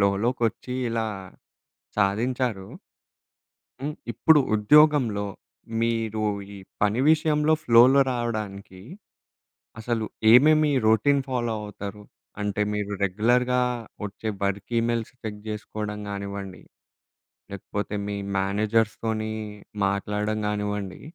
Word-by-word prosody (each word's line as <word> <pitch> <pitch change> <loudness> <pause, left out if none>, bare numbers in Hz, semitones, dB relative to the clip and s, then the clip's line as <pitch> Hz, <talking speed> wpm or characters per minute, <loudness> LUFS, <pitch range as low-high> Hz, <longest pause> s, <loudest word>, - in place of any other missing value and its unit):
ఫ్లోలోకొచ్చి 120 +3 -1 0.2
ఇలా 115 -1 -1 0.9
సాధించారు. 110 0 0 1.1
హ్మ్. 150 +2 -3 0.2
ఇప్పుడు 150 +7 +5 0.2
ఉద్యోగంలో 125 -2 +4 0.6
మీరు 115 -2 -1 0.3
ఈ - - -9 0.2
పని 105 +4 +2
విషయంలో 155 -1 +3
ఫ్లోలో 125 +3 +6
రావడానికి, 105 -6 -4 1.0
అసలు 115 0 -1 0.3
ఏమేమి 150 +4 +6 0.2
రొటీన్ 140 +6 +4
ఫాలో 120 -3 -1
అవుతారు? 105 0 -7 0.4
అంటే 105 0 -1
మీరు 105 -1 -3
రెగ్యులర్‌గా 125 +6 +2 0.4
వచ్చే 105 +2 -5
వర్క్ 100 0 -2
ఈమెయిల్స్ 115 -1 -1
చెక్ 105 -1 -5
చేసుకోవడం 105 0 -5
గానివ్వండి, 100 -1 -6 0.9
లేకపోతే 100 +1 -4
మీ 100 0 -3 0.2
మేనేజర్స్ 105 +3 +1
తోని 110 -1 -2 0.5
మాట్లాడడం 105 +2 -1
గానివ్వండి 105 -2 -3
110 Hz, 90 wpm, -25 LUFS, 105-125 Hz, 1.1 s, ఫ్లోలో